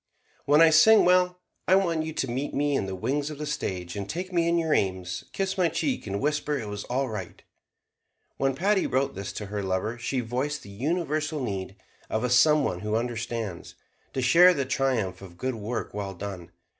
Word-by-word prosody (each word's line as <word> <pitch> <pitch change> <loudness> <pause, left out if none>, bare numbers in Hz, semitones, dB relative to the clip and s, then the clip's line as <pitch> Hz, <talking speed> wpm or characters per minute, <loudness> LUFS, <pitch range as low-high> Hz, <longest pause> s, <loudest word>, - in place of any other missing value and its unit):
"When 150 +3 +5
I 165 -1 +7
sing 215 +8 +7
well, 180 0 +3 0.3
I 185 - +6
want 170 -5 +1
you 160 - -4
to 135 - -2
meet 130 +4 -3
me 145 0 +1
in 95 - -1
the 95 - -4
wings 140 +9 -1
of 150 - -7
the 150 - -4
stage, 95 -12 -3
and 100 -1 -5
taking 185 +3 -4
me 170 -1 +2
in 170 0 +2
your 160 -2 +1
aims, 90 -1 -1
kiss 195 0 -2
my 175 -2 +4
cheek, 255 - -2
and 100 0 -2
whisper 150 +1 0
it 110 -5 -5
was 105 0 -5
all 130 +2 -1
right." 105 -6 -7 0.9
When 135 -1 +1
Patti 195 +5 +2
wrote 135 +1 0
this 100 +1 -5
to 105 - -5
her 100 +1 -4
lover 95 +5 -2
she 130 +2 -1
voiced 130 +5 -3
the 100 - -12
universal 155 - -1
need 100 -6 -4 0.3
of 110 - -1
a 125 - 0
some 150 +4 +5
one 90 - -1
who 105 +2 -2
understands, 115 -4 -3 0.4
to 130 - -1
share 175 +8 +7
the 140 -3 -1
triumph 120 -9 -1
of 90 -3 -12
good 130 +5 -2
work 115 +1 -4
well 100 -2 -4
done. 90 -2 -7
130 Hz, 205 wpm, -26 LUFS, 100-155 Hz, 0.9 s, I